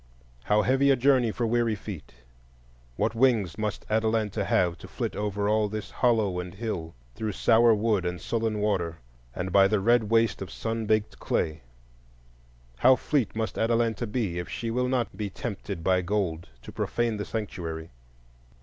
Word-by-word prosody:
How 105 Hz, 0 st, +3 dB
heavy 135 Hz, +3 st, +3 dB
a 135 Hz, -, +6 dB
journey 130 Hz, -2 st, +3 dB
for 120 Hz, -, -2 dB
weary 115 Hz, -1 st, +1 dB
feet! 95 Hz, -, -9 dB, 0.8 s
what 110 Hz, -, 0 dB
wings 115 Hz, -7 st, +2 dB
must 105 Hz, -2 st, -3 dB
Atalanta 110 Hz, -1 st, 0 dB
have 90 Hz, -3 st, +2 dB
to -, -, -10 dB
flit -, -, -4 dB
over 105 Hz, -1 st, -1 dB
all 105 Hz, 0 st, +2 dB
this 110 Hz, 0 st, -5 dB
hollow 110 Hz, -7 st, +1 dB
and 90 Hz, +1 st, -6 dB
hill, 95 Hz, -, -4 dB, 0.2 s
through 105 Hz, -, -3 dB
sour 115 Hz, +2 st, +5 dB
wood 105 Hz, -2 st, +1 dB
and 90 Hz, 0 st, -3 dB
sullen 115 Hz, -2 st, -1 dB
water, 90 Hz, -6 st, 0 dB, 0.4 s
and 95 Hz, +1 st, -3 dB
by 95 Hz, +1 st, +6 dB
the 105 Hz, +1 st, +1 dB
red 115 Hz, +3 st, +3 dB
waste 115 Hz, -2 st, +2 dB
of 95 Hz, -, -5 dB
sun 115 Hz, -1 st, -3 dB
baked 110 Hz, 0 st, 0 dB
clay! 80 Hz, -1 st, -1 dB, 1.2 s
How 130 Hz, -, +6 dB
fleet 135 Hz, -4 st, -1 dB
must 110 Hz, 0 st, -2 dB
Atalanta 115 Hz, 0 st, +1 dB
be 105 Hz, -6 st, -2 dB
if 90 Hz, -, -6 dB
she 115 Hz, -1 st, -3 dB
will 125 Hz, +2 st, 0 dB
not 125 Hz, -2 st, -1 dB
be 105 Hz, -2 st, -3 dB
tempted 85 Hz, -3 st, -5 dB
by 95 Hz, 0 st, +3 dB
gold 85 Hz, -4 st, -2 dB
to -, -, -9 dB
profane 120 Hz, -2 st, -1 dB
the 105 Hz, -, -3 dB
Sanctuary! 85 Hz, -7 st, -5 dB
110 Hz, 170 wpm, -27 LUFS, 95-115 Hz, 1.2 s, a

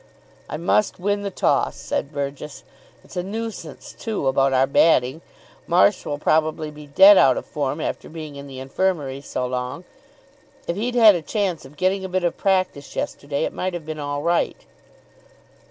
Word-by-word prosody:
"I -, -, -4 dB
must 180 Hz, +5 st, +1 dB
win 205 Hz, +2 st, 0 dB
the 200 Hz, -, -3 dB
toss," 190 Hz, -, +1 dB
said 140 Hz, -, -3 dB
Burgess. 140 Hz, 0 st, -5 dB, 0.4 s
"It's -, -, -15 dB
a 180 Hz, -, 0 dB
nuisance 200 Hz, -5 st, -6 dB
too, 220 Hz, -10 st, -4 dB
about 135 Hz, +1 st, +3 dB
our 130 Hz, 0 st, +4 dB
batting. 135 Hz, 0 st, +3 dB, 0.5 s
Marsh 180 Hz, +3 st, +3 dB
will 145 Hz, -, -2 dB
probably 155 Hz, +1 st, +1 dB
be 150 Hz, 0 st, -12 dB
dead 190 Hz, +7 st, +8 dB
out 130 Hz, -2 st, +5 dB
of -, -, -4 dB
form 145 Hz, 0 st, -3 dB
after -, -, -4 dB
being 155 Hz, -3 st, -8 dB
in 140 Hz, 0 st, -9 dB
the 135 Hz, -1 st, -9 dB
Infirmary 140 Hz, -1 st, -1 dB
so 130 Hz, -2 st, -3 dB
long. 125 Hz, +5 st, -4 dB, 0.8 s
If 170 Hz, -, -1 dB
he'd 240 Hz, +5 st, -2 dB
had 225 Hz, -3 st, +8 dB
a 175 Hz, -, -2 dB
chance 185 Hz, 0 st, -2 dB
of 140 Hz, +3 st, -15 dB
getting 190 Hz, +1 st, +1 dB
a 190 Hz, -, -4 dB
bit 185 Hz, 0 st, -1 dB
of 175 Hz, -, 0 dB
practice 185 Hz, -7 st, -1 dB
yesterday, 140 Hz, 0 st, -3 dB
it -, -, -2 dB
might 185 Hz, -1 st, -3 dB
have 165 Hz, -3 st, -6 dB
been 155 Hz, 0 st, -6 dB
all 145 Hz, 0 st, -3 dB
right." 170 Hz, 0 st, +1 dB
155 Hz, 180 wpm, -22 LUFS, 140-185 Hz, 0.8 s, dead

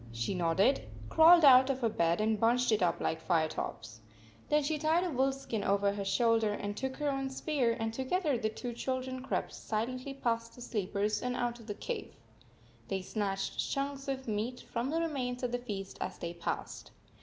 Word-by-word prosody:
She 115 Hz, +10 st, -2 dB
nodded, 180 Hz, +8 st, +2 dB, 0.2 s
crawled 330 Hz, 0 st, +7 dB
out 260 Hz, 0 st, +8 dB
of 265 Hz, -1 st, -1 dB
her 235 Hz, -, +3 dB
bed, 170 Hz, -3 st, +1 dB
and 215 Hz, 0 st, +1 dB
bunched 240 Hz, +2 st, +3 dB
it 215 Hz, -, +2 dB
up 175 Hz, -2 st, +2 dB
like 160 Hz, -, -1 dB
Firetop 160 Hz, -8 st, -1 dB
s. 115 Hz, 0 st, -11 dB, 0.5 s
Then 300 Hz, 0 st, +3 dB
she 305 Hz, +1 st, -1 dB
tied 320 Hz, +3 st, +2 dB
a 360 Hz, -, -2 dB
wolf 265 Hz, 0 st, +1 dB
skin 230 Hz, -6 st, -4 dB
over 200 Hz, 0 st, +2 dB
her 200 Hz, -1 st, -3 dB
shoulder 225 Hz, +1 st, +2 dB
and 205 Hz, 0 st, -4 dB
took 265 Hz, +3 st, -3 dB
her 295 Hz, -, -1 dB
own 270 Hz, 0 st, -2 dB
spear, 265 Hz, -4 st, 0 dB
and 225 Hz, 0 st, -2 dB
together 285 Hz, +4 st, 0 dB
the 220 Hz, -2 st, 0 dB
two 240 Hz, +2 st, -5 dB
children 260 Hz, +1 st, -3 dB
crept 265 Hz, -, -2 dB
silently 255 Hz, +5 st, -3 dB
past 230 Hz, -3 st, -2 dB
the 245 Hz, -, -12 dB
sleepers 210 Hz, -2 st, -1 dB
and 250 Hz, 0 st, -2 dB
out 240 Hz, -1 st, -2 dB
of 230 Hz, -, -14 dB
the 205 Hz, -, -4 dB
cave. 470 Hz, -, -5 dB, 0.7 s
They 190 Hz, -1 st, -2 dB
snatched 195 Hz, -1 st, -2 dB
chunks 275 Hz, 0 st, -2 dB
of 265 Hz, -1 st, -3 dB
meat 225 Hz, +4 st, -2 dB
from 235 Hz, +2 st, -1 dB
the 325 Hz, +3 st, 0 dB
remains 255 Hz, -6 st, -2 dB
of 245 Hz, -, 0 dB
the 245 Hz, -, -1 dB
feast 200 Hz, -5 st, -6 dB
as -, -, -3 dB
they 170 Hz, 0 st, -5 dB
passed. 170 Hz, -1 st, -5 dB
240 Hz, 200 wpm, -32 LUFS, 205-270 Hz, 0.7 s, out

